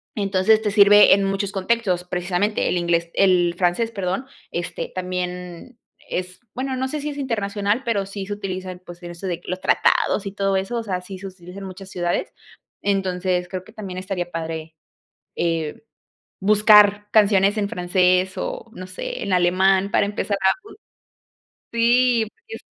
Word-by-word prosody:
Entonces, 200 +1 +3
te 210 - -1
sirve 205 0 +7
en 195 0 +3
muchos 195 0 -1
contextos, 195 -2 0
precisamente 180 +3 -1
el - - 0
inglés 170 -1 0
el 180 -3 +3
francés, 185 +6 +1
perdón, 195 +3 -2 0.3
este, 170 0 -4
también 180 +3 -5 0.3
es 180 0 -4
bueno, 260 +1 -3
no 260 +1 -1
sé 300 +2 -4
si 300 - -3
es 290 - -7
internacional, 210 -3 -1
pero 220 -6 0
sí 195 0 -6
se 205 - -4
utiliza 185 -2 -5
en 180 - -10
pues, 175 -1 -13
en 175 - -7
eso 175 +3 -7
de 175 -1 -3
los 185 - -4
tratados 205 - +2
y 195 - -4
todo 195 -1 0
eso, 195 +5 -2
o 230 - -2
sea, 185 -4 -3
sí 185 +1 -9
se 195 - -7
utiliza 180 0 -11
en 195 - -7
muchas 190 0 -9
ciudades. 175 -2 -2 0.5
Entonces, 185 -2 0
creo 185 0 -5
que 220 +4 -17
también 190 -4 -6
estaría 180 -2 -4
padre, 160 -1 -5 0.6
eh, 165 -1 -2 0.6
buscar 210 0 +5
canciones 205 -1 +4
en 205 -1 0
francés, 180 +1 +2
o, - - -5
no 185 0 -8
sé, 185 - -5
en 200 - -3
alemán 190 +2 +3
para - - +3
empezar 205 0 -2
a 190 - +5 1.0
bu - - -
si, 240 +1 +4
y - - -6 0.3
es - - -11
190 Hz, 175 wpm, -22 LUFS, 180-205 Hz, 1.0 s, sirve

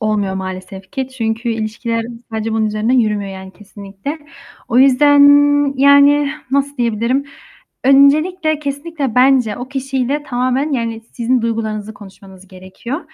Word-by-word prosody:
olmuyor 210 -3 -1
maalesef 190 0 -7
ki 265 -1 -4
çünkü 230 -2 -3
ilişkiler 230 +1 -3 0.3
sadece 220 0 -3
bunun 220 0 0
üzerinden 215 +3 -1
yürümüyor, 210 -3 -1
yani, 190 0 -10
kesinlikle. 200 - -9 0.5
O 240 - +2
yüzden, 280 +2 +5 0.6
yani, 280 +1 +5 0.2
nasıl 280 +1 -1
diyebilirim? 235 +3 -1 0.6
Öncelikle, 310 +4 +3
kesinlikle 285 -2 -4
bence 250 -3 +3
o 245 +1 -7
kişiyle 270 +1 -2
tamamen, 255 +2 -1
yani, 230 -3 -2
sizin 245 0 0
duygularınızı 220 -2 -3
konuşmanız 195 -1 -15
gerekiyor 190 - -8
235 Hz, 125 wpm, -16 LUFS, 215-275 Hz, 0.6 s, yüzden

